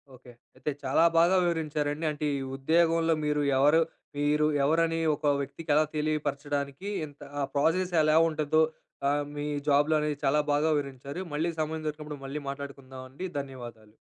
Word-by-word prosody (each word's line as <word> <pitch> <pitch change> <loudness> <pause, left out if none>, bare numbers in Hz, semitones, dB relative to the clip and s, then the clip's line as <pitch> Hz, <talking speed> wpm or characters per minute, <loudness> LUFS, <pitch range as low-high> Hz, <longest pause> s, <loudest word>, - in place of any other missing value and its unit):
Okay. 125 0 -15 0.2
అయితే 150 - -3
చాలా 135 +5 +3
బాగా 170 +3 +5
వివరించారండి. 155 -2 -1
అంటే 150 0 -4
ఈ - - -4
ఉద్యోగంలో 165 +3 +3
మీరు 150 0 +1 0.2
ఎవరు 150 +4 +5 0.4
మీరు 150 +1 +2 0.2
ఎవరని 165 +3 +2 0.2
ఒక 150 - -7
వ్యక్తికెలా 150 +2 +1
తెలియపరచడానికి 145 +1 -2 0.2
ఇంత 145 -1 -16 0.2
ఆ - - 0
ప్రోసెస్ 170 +6 +2
ఎలా 155 0 +3
ఉంటుందో 155 0 +1 0.5
ఆహ్, 145 +1 +1
మీ 145 0 -4 0.2
జాబ్‌ 145 +1 +4
లోని, 150 -1 +2 0.2
చాలా 145 +2 +3
బాగా 150 +2 +2
వివరించారు. 140 +1 -4
మళ్ళీ 160 +3 0
సమయం 155 0 -2
దొరికినప్పుడు 150 -1 -5
మళ్ళీ 140 +2 -5
మాట్లాడుకుందామండి 135 +2 -7
ధన్యవాదాలు. 120 -6 -9
150 Hz, 140 wpm, -28 LUFS, 140-160 Hz, 0.5 s, బాగా